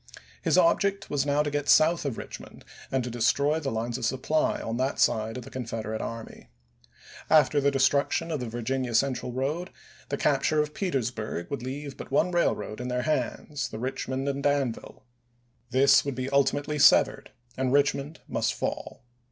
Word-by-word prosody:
His - - +2
object 200 -12 +2
was 145 -1 0
now 145 +1 +2
to 145 - -3
get 145 0 -2
south 165 +1 +5
of 135 -5 -2
Richmond - - -10 0.3
and 130 -1 0
to 125 - -5
destroy 140 +6 +2
the 145 -4 -3
lines 115 +2 -3
of - - -7
supply 140 +5 0
on 115 +1 -4
that 130 +2 -1
side 110 +2 +1
of 125 - -6
the - - -12
Confederate 115 -3 -4
army. 115 -1 -7 0.8
After 150 -2 +4
the 140 - +3
destruction 140 +4 +1
of 155 - -1
the 125 -2 -4
Virginia 120 +1 -2
Central 130 -1 +1
road, 145 +9 -2 0.4
the 140 - -1
capture 150 +2 +2
of 150 0 -1
Petersburg 120 - -3
would 140 - -3
leave 140 +2 -6
but - - -8
one 160 +6 +2
rail 175 -1 +2
road 110 +2 -7
in 125 - -4
their 125 0 -1
hands, 145 0 -2
the 110 - -7
Eichmond 130 +2 -3
and 140 0 -1
Danville; 140 -6 -2 0.6
this 135 +1 +5
would 140 -2 -3
be 130 +2 -4
ultimately 145 +2 +1
severed, - - +5 0.3
and 130 -1 -1
Eichmond 140 +2 +1
must - - -1
fall. - - -4
135 Hz, 175 wpm, -27 LUFS, 125-145 Hz, 0.8 s, south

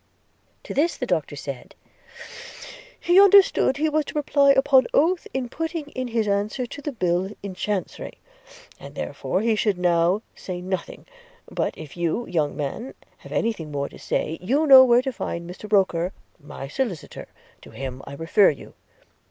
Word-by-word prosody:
– - - -41
To - - -7
this 325 +5 +1
the - - -3
Doctor - - -1
said, - - -8 1.2
'He 355 +3 +5
understood 395 -8 +5
he 310 +2 +1
was 310 0 +1
to - - -9
reply 285 -1 +3
upon 270 -1 +4
oath 340 +4 +2
in 265 -2 -3
putting 320 +2 -4
in 255 -2 -4
his 225 -2 -1
answer 205 +5 -1
to 285 +4 -9
the 295 - -4
bill 180 -5 0
in 200 -2 -5
chancery, 200 +1 -4 0.7
and - - -11
therefore 185 - -3
he 225 0 +2
should 210 -3 0
now 175 +3 +2
say 180 -2 -7
nothing: 185 -1 -5 0.5
but - - -2
if 155 -3 -10
you, 175 +7 -1
young 155 -5 -1
man, 150 - -5 0.2
have - - -14
any 230 0 0
thing 160 -7 -9
more 140 -1 -3
to - - -14
say, 160 +1 -2
you 270 +12 +1
know 265 -3 +10
where 245 0 +4
to 265 -1 -3
find 170 -6 -5
Mr 190 +4 -10
Roker, 185 -3 +2 0.3
my 135 -1 -9
solicitor; 185 - -4 0.3
to - - -14
him 130 -1 -7
I 140 - -8
refer 165 +6 +4
you. 140 - -7
210 Hz, 175 wpm, -23 LUFS, 175-270 Hz, 1.2 s, know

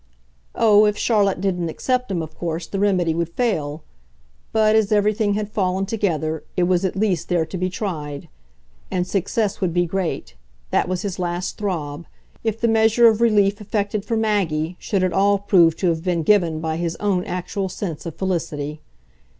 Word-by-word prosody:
Oh, 215 -1 +5
if 210 0 +1
Charlotte 200 -5 +2
didn't 180 -4 -1
accept 250 +8 -1
him, 175 -4 -1
of 155 0 -10
course 165 0 -3
the 195 - -4
remedy 185 -5 +2
would 170 0 -1
fail; 160 -9 -2 0.7
but, 215 -1 +3
as 220 -2 +2
everything 210 0 +2
had 210 0 -2
fallen 190 -2 0
together, 160 -7 -1
it 180 - +3
was 180 +1 +2
at 190 - -1
least 190 -5 0
there 175 -3 +2
to 185 - -8
be 185 0 -1
tried. 150 -8 -5 0.6
And 180 -1 -1
success 200 +3 -1
would 180 -3 0
be 175 0 +3
great 180 0 -3 0.4
that - - +2
was 185 +2 -2
his 195 -3 -4
last 175 0 -2
throb 165 -6 -3 0.4
if 225 -1 -1
the 235 - +2
measure 225 +1 +5
of 225 0 +3
relief 210 -2 +3
effected 205 0 -2
for 225 +2 -1
Maggie 180 -7 0
should 195 -3 -1
at 185 -2 +1
all 200 +2 +3
prove 180 -5 +4
to 185 - +1
have 165 -1 -1
been 175 -3 0
given 170 -5 +3
by 160 0 -2
his 170 -1 -2
own 195 -3 0
actual 180 +2 -3
sense 175 -5 -5
of 165 - -6
felicity. 150 -5 -3
185 Hz, 185 wpm, -22 LUFS, 170-210 Hz, 0.7 s, Oh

